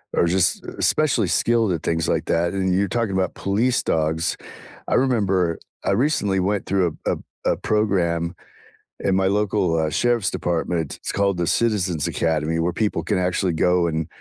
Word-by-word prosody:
are - - +3
just 90 +1 +1
especially 135 -9 +2
skilled 115 +3 +2
at 80 - -4
things 80 -1 0
like - - 0
that, 85 +1 0
and 95 -1 0
you're 100 +2 +2
talking 115 0 -1
about 95 0 0
police 115 +6 0
dogs, 80 +1 0 0.5
I - - -1
remember, 100 -10 +1 0.3
I - - +2
recently 105 -4 +1
went 100 +2 0
through 95 -2 +1
a - - -2
p - - -15
a - - +2
p - - -15 0.2
a - - +2
program 90 -6 0 0.7
in 95 - +1
my 95 0 +2
local, 100 -4 +1
uh, 80 -1 0
sheriff's 120 +2 +1
department, 85 -3 -2
it's - - -4
called 100 -2 +1
the 85 -1 -1
Citizens 95 -9 +1
Academy 80 0 0
where 85 +1 0
people 105 -4 -1
can 85 - 0
actually 90 0 0
go 90 +1 +2
and 80 -1 -2
95 Hz, 180 wpm, -22 LUFS, 85-105 Hz, 0.7 s, are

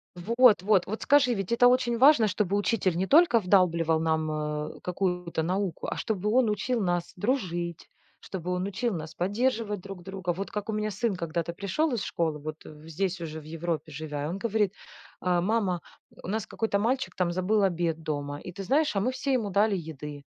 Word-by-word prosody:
Вот-вот. 210 -1 +4
Вот 215 +3 -5
скажи, 275 -4 +4
ведь 195 -3 -4
это 240 +1 +6
очень 245 -1 +2
важно, 260 -3 +6
чтобы 200 0 0
учитель 200 -3 +1
не 190 +2 0
только 300 - +6
вдалбливал 170 -5 +3
нам, 160 -1 0
э, 150 0 -3
какую-то 180 -2 -2
науку, 185 +1 -2
а - - -3
чтобы 210 -3 -1
он 240 0 +3
учил 220 +3 -1
нас 175 -1 -1
дружить, 175 - -2 0.3
чтобы 180 -2 -5
он 180 +1 -1
учил 225 +4 -1
нас 160 -2 -6
поддерживать 210 +2 0
друг 195 -2 -9
друга. 190 -1 -3
Вот 195 +3 -5
как 210 +1 -4
у - - 0
меня 215 0 -1
сын 210 +1 -1
когда-то 170 -1 -3
пришел 200 - -1
из 225 -5 -1
школы, 160 -3 -1
вот 155 +1 -6
здесь 165 +5 -4
уже 160 -1 -5
в - - -16
Европе 160 0 -4
живя, 145 -1 -4
и - - -2
он 175 +4 -3
говорит: 210 -2 0 0.5
"А, 180 -1 +1
мама, 190 -3 0 0.4
у - - -7
нас 215 +2 -2
какой-то 220 -3 -1
мальчик 250 +5 -1
там 180 -2 0
забыл 190 +4 +1
обед 170 -3 0
дома 145 -1 -3
и, 180 - -8
ты 195 +2 -7
знаешь, 290 +6 +2
а - - +2
мы 235 +6 +1
все 265 +1 -2
ему 225 -5 0
дали 205 +2 +2
еды." 150 -4 -7
190 Hz, 195 wpm, -27 LUFS, 170-220 Hz, 0.5 s, это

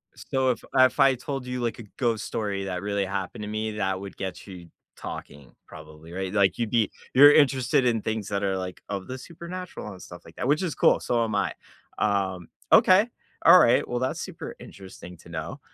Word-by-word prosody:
So, 130 -1 0
if 120 - -5
if 130 0 +4
I 135 -1 +5
told 135 +1 -5
you, 125 -1 -4
like, 120 0 -2
a - - -7
ghost 115 -4 0
story 100 -3 -3
that 90 -1 -4
really 100 -1 -1
happened 95 +1 -4
to 105 - -5
me, 110 +1 -3
that 95 -2 -1
would 100 0 -9
get 95 -1 -6
you 90 -3 -10 0.3
talking 70 -3 -9
probably, 80 +1 -13
right? 95 +2 -4
Like, 100 -2 +3
you'd 115 -3 -1
be 115 -3 +1 0.2
you're 145 +3 +9
interested 135 -1 +3
in 115 -3 +1
things 110 -2 -3
that 100 0 -2
are, 95 -1 0
like, 90 -1 -6
of 100 -2 -4
the 130 - -5
supernatural 170 -1 -8
and 95 -2 -12
stuff 90 - -11
like 80 - -15
that, 125 - -3
which 150 +6 +2
is 160 -7 -2
cool, - - +4
so 120 -1 0
am 110 - -2
I. - - 0 0.4
Um, 95 -4 -1 0.2
okay, 190 +4 +6 0.4
alright. 125 -9 +7
Well, 120 0 -2
that's 130 +1 -2
super - - -7
interesting 95 -2 -12
to 85 - -17
know. 85 - -6
105 Hz, 205 wpm, -26 LUFS, 95-130 Hz, 0.4 s, you're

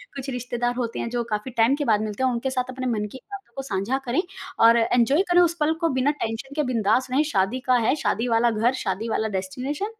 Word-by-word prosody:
कुछ 275 0 -5
रिश्तेदार 245 -1 -2
होते 240 -2 -3
हैं 235 - -3
जो 240 0 -1
काफ़ी 220 +2 -4
टाइम 230 +4 +4
के 290 0 -3
बाद 215 -4 +3
मिलते 215 +3 -3
हैं - - +4
और - - -1
उनके 235 +3 -2
साथ 255 -1 -2
अपने 255 0 -5
मन 215 -3 -1
की - - -8
बातों 395 0 -9
को 270 - -3
साझा 210 +1 -1
करें 250 +7 +1 0.4
और 230 +1 +7
एन्जॉय 245 +6 +3
करें 355 - +6
उस 340 -1 +3
पल 300 +1 +2
को 330 - +3
बिना 275 +3 +3
टेंशन 230 +5 -4
के 300 - +1
बिंदास 225 +2 +2
रहें 275 +4 +3
शादी 195 +6 +1
का 255 - +6
है - - +3
शादी 235 -5 -1
वाला 235 0 +3
घर, 225 +3 +1
शादी 220 -2 -3
वाला 220 0 0
डेस्टिनेशन। 260 - -4
245 Hz, 245 wpm, -24 LUFS, 225-265 Hz, 0.4 s, और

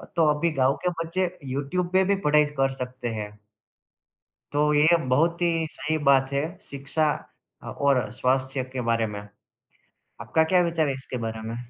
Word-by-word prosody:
तो 165 -2 +4
अभी 165 +2 0
गाँव 130 +2 +4
के - - +4
बच्चे 180 +2 -1 0.2
यूट्यूब 140 +7 -2
पे 190 0 +5
भी - - +4
पढ़ाई 150 0 +5
कर 135 0 +2
सकते 125 -1 -5
हैं। 105 0 -5 1.2
तो 150 +1 +2
ये 155 +3 +5
बहुत 165 +7 +2
ही 165 -2 +1
सही 155 +1 -2
बात 135 -1 +4
है 140 - +1 0.2
शिक्षा 140 0 -1 0.5
अ, - - -10
और 140 -6 +1
स्वास्थ्य 130 +1 0
के 130 - -2
बारे 115 -1 +1
में। 105 -1 -6 1.0
आपका 160 - +2
क्या 180 +2 +3
विचार 165 -3 0
है 135 - 0
इसके 130 -1 -6
बारे 110 0 -4
में? 115 - -4
145 Hz, 170 wpm, -25 LUFS, 130-165 Hz, 1.2 s, पे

